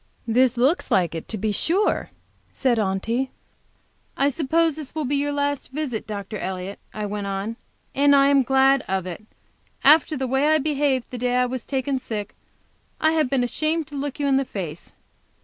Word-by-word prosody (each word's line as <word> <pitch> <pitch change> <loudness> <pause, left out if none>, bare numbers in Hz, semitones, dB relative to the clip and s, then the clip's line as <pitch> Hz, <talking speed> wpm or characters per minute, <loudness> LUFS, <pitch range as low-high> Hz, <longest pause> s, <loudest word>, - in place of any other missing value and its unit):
"This 245 +2 +3
looks 270 +9 +2
like 175 -4 +2
it, 165 - -6
to 220 - -4
be 215 +2 -1
sure!" 350 - +1 0.4
said 245 -4 +1
Aunty. 220 +6 -1 0.9
"I 280 - +3
suppose 320 +2 +1
this 305 -2 -8
will 310 -2 -1
be 280 +3 0
your 290 +1 0
last 285 -1 -1
visit, 265 -7 -4
Dr. 205 0 -5
Elliott," 190 +1 -5
I 210 -1 -4
went 205 0 -4
on, 195 +3 -3 0.4
"and 285 +1 +5
I 275 0 +5
am 280 -1 +5
glad 270 +1 +4
of 190 -1 -1
it. 185 +3 -7 0.6
After 305 +1 +5
the 265 - -1
way 265 +3 +1
I 310 0 +5
behaved 285 -3 0
the 250 - -5
day 245 0 0
I 250 0 +3
was 250 -1 -5
taken 270 0 -1
sick, 215 -5 -5 0.7
I 315 - +3
have 310 -5 +1
been 265 -2 +1
ashamed 310 +6 0
to 290 - -9
look 285 0 -4
you 290 - 0
in 275 -1 +3
the 275 - +2
face. 175 - -6
265 Hz, 190 wpm, -23 LUFS, 215-285 Hz, 0.9 s, and